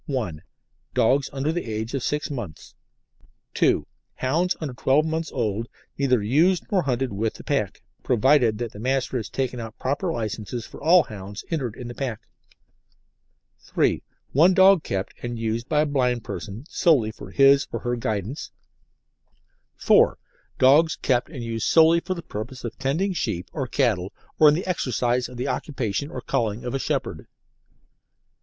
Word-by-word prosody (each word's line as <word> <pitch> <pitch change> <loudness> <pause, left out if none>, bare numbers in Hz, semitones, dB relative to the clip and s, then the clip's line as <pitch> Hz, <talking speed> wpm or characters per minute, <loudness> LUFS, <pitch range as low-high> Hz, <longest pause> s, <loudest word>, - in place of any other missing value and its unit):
(1) 110 - -3 0.5
Dogs 135 +4 +3
under 140 +2 -1
the 175 +1 -2
age 110 +3 -4
of 135 - -1
six 150 +4 -2
months; 105 - -7 0.8
(2) - - +2 0.3
hounds 165 +8 0
under 150 -5 -4
twelve 135 +4 +2
months 160 0 -2
old 115 -2 -2 0.3
neither 130 -6 +2
used 165 - +3
nor 195 -3 +3
hunted 130 -5 -1
with 110 +3 -1
the - - -11
pack, - - -2 0.2
provided 125 -2 +3
that 120 -1 -4
the 105 - -11
Master 130 +2 0
has 110 - -4
taken 130 -2 -2
out 115 -1 -7
proper 145 +7 -1
licences 110 - -4
for - - -12
all 170 +3 +6
hounds 100 -1 -8
entered 130 -9 -2
in 125 - -7
the 120 - -6
pack; 120 -5 -4 1.4
(3) - - 0 0.3
one 175 +7 +5
dog 190 -2 +7
kept 95 -6 -3
and 120 -1 -4
used 115 +1 -2
by 150 -1 +3
a - - +2
blind 125 -5 0
person 110 +5 -7
solely 145 -10 +3
for - - -11
his 140 0 +5
or - - -4
her 120 0 -1
guidance; 115 - -3 1.3
(4) - - +4 0.4
dogs 150 +5 +5
kept 125 -1 0
and 135 -7 -7
used 115 -1 -2
solely 165 +1 +6
for 185 +2 -4
the 170 - -7
purpose 110 +5 -7
of 120 -2 -5
tending 160 +9 0
sheep 90 - -3
or 135 -4 -3
cattle 105 -9 0 0.3
or 155 - +8
in 150 - +3
the 175 - -3
exercise 125 - 0
of 125 - -10
the 125 +3 -2
occupation 130 -2 -2
or 130 - -6
calling 110 -1 -1
of 125 - -3
a 135 - -1
shepherd. - - -3
130 Hz, 165 wpm, -24 LUFS, 115-150 Hz, 1.4 s, or